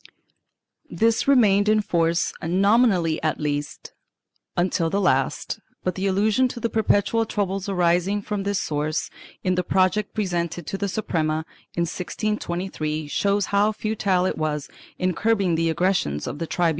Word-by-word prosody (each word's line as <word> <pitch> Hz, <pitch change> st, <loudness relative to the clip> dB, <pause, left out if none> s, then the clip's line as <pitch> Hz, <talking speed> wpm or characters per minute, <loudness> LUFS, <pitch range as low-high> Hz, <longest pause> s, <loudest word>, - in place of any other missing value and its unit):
2 -, -, -9 dB
This 225 Hz, +2 st, +2 dB
remained 210 Hz, -7 st, +4 dB
in 215 Hz, 0 st, +4 dB
force 170 Hz, -4 st, +1 dB
nominally 190 Hz, -1 st, +3 dB
at 155 Hz, -1 st, -1 dB
least, 145 Hz, -1 st, -4 dB, 0.6 s
until 175 Hz, -2 st, +1 dB
the 200 Hz, -, 0 dB
last, 195 Hz, -, 0 dB, 0.2 s
but 185 Hz, -, 0 dB
the 190 Hz, +3 st, -2 dB
allusion 210 Hz, +6 st, +2 dB
to 245 Hz, -, -7 dB
the 230 Hz, 0 st, -2 dB
perpetual 220 Hz, +1 st, +2 dB
troubles 195 Hz, -2 st, -2 dB
arising 180 Hz, +2 st, +2 dB
from 210 Hz, -1 st, -3 dB
this 200 Hz, 0 st, -1 dB
source, 150 Hz, +1 st, -2 dB, 0.3 s
in 185 Hz, -, +2 dB
the 180 Hz, 0 st, 0 dB
project 190 Hz, +3 st, +1 dB
pre 215 Hz, -, 0 dB
sented 175 Hz, -1 st, -2 dB
to 195 Hz, -, -4 dB
the 200 Hz, -, -1 dB
Suprema 160 Hz, -6 st, -1 dB, 0.3 s
in 170 Hz, -, 0 dB
1623, 175 Hz, -4 st, -3 dB
shows 200 Hz, +4 st, +1 dB
how 205 Hz, +2 st, +4 dB
futile 205 Hz, -4 st, 0 dB
it 185 Hz, -, -1 dB
was 150 Hz, -2 st, -2 dB, 0.3 s
in 185 Hz, 0 st, 0 dB
curbing 200 Hz, -2 st, +1 dB
the 165 Hz, 0 st, +1 dB
aggressions 160 Hz, -, 0 dB
of 145 Hz, -, -5 dB
the 165 Hz, -, -3 dB
tribunals. 175 Hz, 0 st, +1 dB
185 Hz, 155 wpm, -24 LUFS, 165-205 Hz, 0.6 s, remained